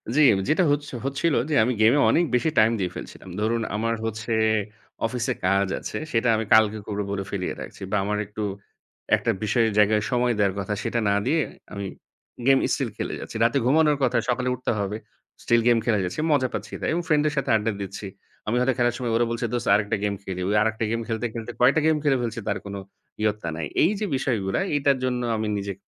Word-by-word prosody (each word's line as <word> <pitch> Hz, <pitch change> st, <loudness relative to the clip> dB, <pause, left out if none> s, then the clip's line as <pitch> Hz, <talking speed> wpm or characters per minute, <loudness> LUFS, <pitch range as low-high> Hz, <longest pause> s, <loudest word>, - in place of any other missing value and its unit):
জি, -, -, +3 dB, 0.3 s
যেটা 170 Hz, +4 st, +3 dB
হচ্ছ 145 Hz, 0 st, -1 dB, 0.2 s
হচ্ছিল 140 Hz, +4 st, 0 dB, 0.2 s
যে -, -, -1 dB
আমি 125 Hz, -, +1 dB
গেম 110 Hz, +3 st, +6 dB
এ -, -, +3 dB
অনেক 175 Hz, -, +3 dB
বেশি 160 Hz, +6 st, +2 dB
টাইম 110 Hz, +1 st, +5 dB
দিয়ে 90 Hz, -2 st, -1 dB
ফেলছিলাম। -, -, -9 dB
ধরুন 115 Hz, +2 st, 0 dB
আমার 115 Hz, +2 st, 0 dB
হচ্ছে 110 Hz, +1 st, -4 dB, 0.7 s
অফিসে 125 Hz, +2 st, -1 dB
কাজ 100 Hz, +1 st, +3 dB
আছে, -, -, -5 dB
সেটা 115 Hz, +1 st, +1 dB
আমি 110 Hz, 0 st, -1 dB
কালকে 110 Hz, -1 st, +5 dB
করে 105 Hz, -1 st, -2 dB
বলে 100 Hz, -1 st, -2 dB
ফেলিয়ে 95 Hz, -3 st, -3 dB
রাখছি -, -, -10 dB
বা 105 Hz, -, +1 dB
আমার 105 Hz, +1 st, -1 dB
একটু 105 Hz, +2 st, -7 dB, 0.7 s
একটা -, -, 0 dB
বিষয়ের 115 Hz, +1 st, +2 dB
জায়গায় 105 Hz, 0 st, +4 dB
সময় 125 Hz, -1 st, +2 dB
দেওয়ার 100 Hz, -2 st, +2 dB
কথা 100 Hz, +1 st, -2 dB
সেটা 120 Hz, -, -1 dB
না 100 Hz, -, +3 dB
দিয়ে 160 Hz, +5 st, +2 dB, 0.3 s
আমি 100 Hz, -1 st, -4 dB, 0.6 s
গেম 135 Hz, 0 st, +6 dB, 0.2 s
স্টিল -, -, -1 dB
খেলে -, -, -3 dB
যাচ্ছি। -, -, -9 dB
রাতে 115 Hz, +4 st, +3 dB
ঘুমানোর 150 Hz, +2 st, +4 dB
কথা 125 Hz, -2 st, +2 dB
সকালে 125 Hz, +1 st, 0 dB
উঠতে 125 Hz, -, -2 dB
হবে। 100 Hz, +1 st, -2 dB, 0.5 s
স্টিল 120 Hz, 0 st, +3 dB
গেম 120 Hz, -1 st, +5 dB
খেলে 110 Hz, -4 st, +2 dB
যাচ্ছি 90 Hz, +8 st, -5 dB
মজা 130 Hz, -3 st, +3 dB
পাচ্ছি -, -, -5 dB
তাই। -, -, -1 dB
এবং 175 Hz, -, 0 dB
ফ্রেন্ড 150 Hz, -2 st, +3 dB
এর 150 Hz, -, -1 dB
সাথে 140 Hz, -, -1 dB
আড্ডা 110 Hz, +1 st, +1 dB
দিচ্ছি। 100 Hz, +1 st, -6 dB, 0.4 s
আমি 110 Hz, -, 0 dB
হয়তো 130 Hz, +1 st, +2 dB
খেলার 120 Hz, -1 st, +2 dB
সময় 120 Hz, -2 st, -2 dB
ওরা 120 Hz, +1 st, +3 dB
বলছে, 115 Hz, 0 st, -2 dB
"দোস্ত 120 Hz, -, -2 dB
আরেকটা 105 Hz, +1 st, 0 dB
গেম 100 Hz, -1 st, 0 dB
খেলি।" 95 Hz, -2 st, -5 dB
ওই 105 Hz, -, +1 dB
আরেকটা 110 Hz, +1 st, 0 dB
গেম 115 Hz, -, 0 dB
খেলতে, 115 Hz, 0 st, -2 dB
খেলতে 115 Hz, 0 st, -5 dB
কয়েকটা 135 Hz, +5 st, +5 dB
গেম 160 Hz, -, +4 dB
খেলে 140 Hz, -3 st, +3 dB
ফেলছি 120 Hz, 0 st, -3 dB
তার -, -, 0 dB
কোনো 100 Hz, 0 st, -5 dB, 0.4 s
ইয়ত্তা 105 Hz, -4 st, -1 dB
নাই। 80 Hz, -1 st, -3 dB, 0.2 s
এই 165 Hz, -, +4 dB
যে 215 Hz, -, -1 dB
বিষয়গুলা 110 Hz, -8 st, -1 dB, 0.2 s
এইটার 140 Hz, -1 st, +2 dB
জন্য 125 Hz, -1 st, 0 dB, 0.2 s
আমি 110 Hz, 0 st, -2 dB
নিজে 100 Hz, 0 st, -3 dB
115 Hz, 215 wpm, -24 LUFS, 105-130 Hz, 0.7 s, গেম